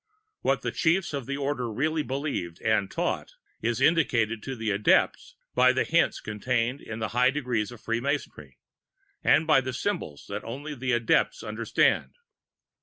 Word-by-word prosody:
What - - +1
the - - -1
Chiefs 170 0 +1
of 140 -4 -4
the 140 0 -2
Order 135 -4 -2
really 155 +7 0
believed 135 - -3
and 110 -3 +2
taught, - - -2 0.3
is 115 +1 0
indicated 115 -8 +2
to 135 - -5
the 110 -3 -2
Adepts 100 +1 +2 0.2
by 130 0 +5
the 130 - +2
hints 170 +1 +2
contained 120 +4 -1
in 110 - -7
the 110 -1 -2
high 125 +2 +3
Degrees 125 -6 -1
of 120 -3 -12
Free 115 0 -1
Masonry, 120 - -4 0.7
and 160 - +4
by 155 -4 +5
the 130 0 -4
symbols 130 - -3
which - - -4
only 140 +6 -6
the 130 -2 -2
Adepts 120 -1 +2
understand. - - +1
125 Hz, 165 wpm, -27 LUFS, 110-145 Hz, 0.7 s, by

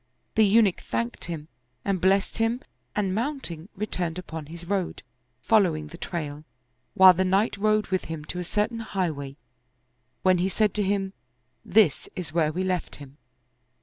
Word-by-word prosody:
The 220 - +5
Eunuch 210 -2 +4
thanked 115 +1 -3
him 160 -3 -5 0.4
and 195 -3 0
blessed 195 +4 +2
him 225 +3 +1 0.3
and 195 -3 0
mounting, 215 - -3
returned 180 -4 -2
upon 160 -4 -7
his 170 +2 -8
road, 190 -1 -2 0.4
fol 220 - +5
lowing 155 -5 -1
the 170 - -10
trail, 150 -4 -4 0.5
while 185 -1 +9
the 185 +2 +1
knight 195 +4 +2
rode 215 +1 +2
with 185 -1 0
him 160 -2 -6
to 180 - -4
a - - -2
cer 210 +4 +1
tain 230 -1 -7
highway, 160 -10 -3 0.9
when 185 -1 +4
he 185 +2 +1
said 210 0 +1
to 210 - +1
him, 195 0 0 0.3
" 125 +1 -46
This 190 -10 +4
is 165 -5 -5
where 160 -2 +2
we 180 +4 -2
left 185 -2 -2
him." 140 0 -12
185 Hz, 175 wpm, -26 LUFS, 160-205 Hz, 0.9 s, while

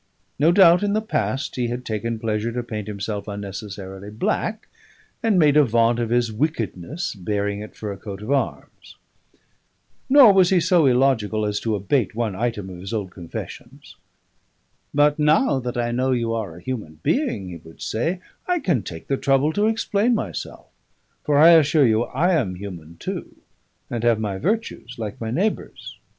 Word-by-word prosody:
No 155 +4 +5
doubt 175 -2 +6
in 205 0 0
the 215 - +2
past 135 - -2
he 125 -1 0
had 120 +1 -5
taken 115 +1 -2
pleasure 110 0 -2
to 125 0 -2
paint 110 -3 -6
himself 100 0 -4
unnecessarily 100 -1 -7
black, 215 - -2 0.5
and 225 -4 +2
made 150 -4 +5
a 150 - +7
vaunt 115 -1 +2
of 115 -2 -1
his 120 -1 +1
wickedness, 140 - -3
bearing 100 0 -2
it 105 - -10
for 105 -2 -5
a 100 - -6
coat 100 +1 -8
of 115 - -4
arms. 140 -1 -3 1.1
Nor 260 -6 +8
was 185 -2 +5
he 190 - +4
so 170 -3 +3
illogical 120 -5 +2
as 105 -1 -1
to 110 -2 -1
abate 105 +3 0
one 115 -4 -1
item 110 -2 -2
of 90 - -9
his 95 +4 -7
old 100 -4 -3
confessions. 85 -2 -9 1.0
"But 145 +1 +3
now 150 - +3
that 125 -1 -4
I 120 0 0
know 130 +2 +1
you 115 -2 -1
are 105 -8 -4
a 85 - -12
human 100 -11 -5
being," 245 - 0
he 85 - -7
would 80 0 -16
say, 165 +11 -2 0.3
"I 360 -1 +2
can 175 - +1
take 80 -3 -8
the 135 - -1
trouble 135 +4 +2
to 205 +4 +2
explain 225 +1 +1
myself. - - -5 0.6
For 150 -2 +2
I 160 +3 +8
assure 155 -3 +5
you 115 0 +2
I 175 +8 +1
am 110 - 0
human 85 -4 -9
too, - - -6 0.5
and 115 -1 -4
have 120 -2 +3
my 100 -3 -3
virtues 205 - -2
like 110 -2 -6
my 110 - -3
neighbours." 190 - -3
120 Hz, 180 wpm, -22 LUFS, 105-155 Hz, 1.1 s, Nor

